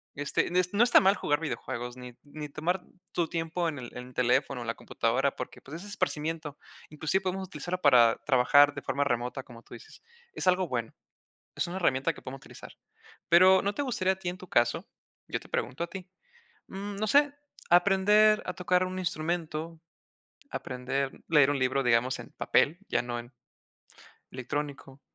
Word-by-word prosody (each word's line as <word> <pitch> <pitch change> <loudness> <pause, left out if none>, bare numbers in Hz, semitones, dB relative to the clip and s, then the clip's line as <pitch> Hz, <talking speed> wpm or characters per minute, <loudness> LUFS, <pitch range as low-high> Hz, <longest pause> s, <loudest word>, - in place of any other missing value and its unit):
Este, 145 0 0
en 175 - -5
es 180 +1 +1
no 210 +3 +5
está 240 - +7
mal 195 +1 +4
jugar 145 -6 0
videojuegos, 125 -4 -5
ni 125 -1 -9
ni 150 +1 -8
tomar 175 +6 -1 0.3
tu 170 -2 0
tiempo, 165 +1 -2
en 145 -3 -6
el 120 -2 -8
en 125 0 -7
el - - -17
teléfono 125 +1 +1
o - - -6
la 115 - -2
computadora, 135 +4 0
porque, - - -7
pues, 155 +5 -9
es 205 - -9
esparcimiento. 155 -6 -3 0.3
Inclusive, 155 +5 -1
podemos 190 +1 -3
utilizarlo 175 +2 -5
para 120 -5 +6
trabajar 145 +2 +5
de 145 - -5
forma 140 - 0
remota, 125 0 -2
como 120 -2 -14
tú - - -15
dices. 115 - -14 0.3
Es - - -3
algo 185 0 +3
bueno. 120 -5 -3 0.6
Es - - -1
una 175 - -5
herramienta 165 -4 +1
que - - -14
podemos 135 +1 -7
utilizar. - - -12 0.6
Pero, 185 +2 +6
¿no 200 +1 -1
te 285 - -2
gustaría 190 -8 0
a - - -20
ti 185 -1 -5
en 180 - -9
tu 185 - -12
caso? 120 -4 +1 0.4
Yo - - -2
te - - -16
pregunto 130 +7 -2
a - - -7
ti, 185 0 -9 0.6
mm, 200 +1 -6
no 215 +2 -1
sé, 285 +4 +4 0.4
¿aprender 200 +4 +5
a 185 - -3
tocar 180 0 +1
un 185 0 -5
instrumento, 165 -2 -3 0.7
aprender 130 +1 -3 0.2
leer 150 -4 +5
un 145 - 0
libro, 130 +1 +1
digamos, 120 +1 +2
en - - -10
papel?, 160 +5 +2
ya 120 - +1
no 120 0 -4
en 120 0 -10 1.0
electrónico. 135 +1 -5
155 Hz, 185 wpm, -29 LUFS, 130-185 Hz, 1.0 s, está